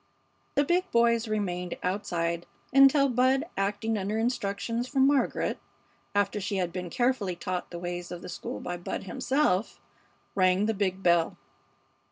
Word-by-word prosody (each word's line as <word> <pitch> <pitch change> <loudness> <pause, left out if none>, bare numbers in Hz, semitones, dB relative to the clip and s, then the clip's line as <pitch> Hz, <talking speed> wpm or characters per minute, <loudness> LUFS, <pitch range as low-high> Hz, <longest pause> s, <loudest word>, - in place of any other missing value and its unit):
The 285 - +4
big 360 +5 +1
boys 235 0 +3
remained 180 -5 -2
outside 170 -3 -1 0.3
until 275 +1 +7
Bud, 260 +2 +3
acting 205 +3 -1
under 200 +3 -2
instructions 230 0 -1
from 265 0 +3
Margaret 280 0 +1 0.6
after 205 0 +1
she 200 +1 -2
had 180 -3 -1
been 180 -1 -4
carefully 240 -4 0
taught 180 +1 -4
the 175 - -7
ways 175 0 -5
of 175 - -7
the - - -7
school - - -5
by 175 - -4
Bud 175 - -5
himself 220 +1 0 0.5
rang 185 +1 +3
the 225 - +1
big 195 -2 -1
bell. 170 -1 +3
200 Hz, 150 wpm, -28 LUFS, 180-240 Hz, 0.6 s, until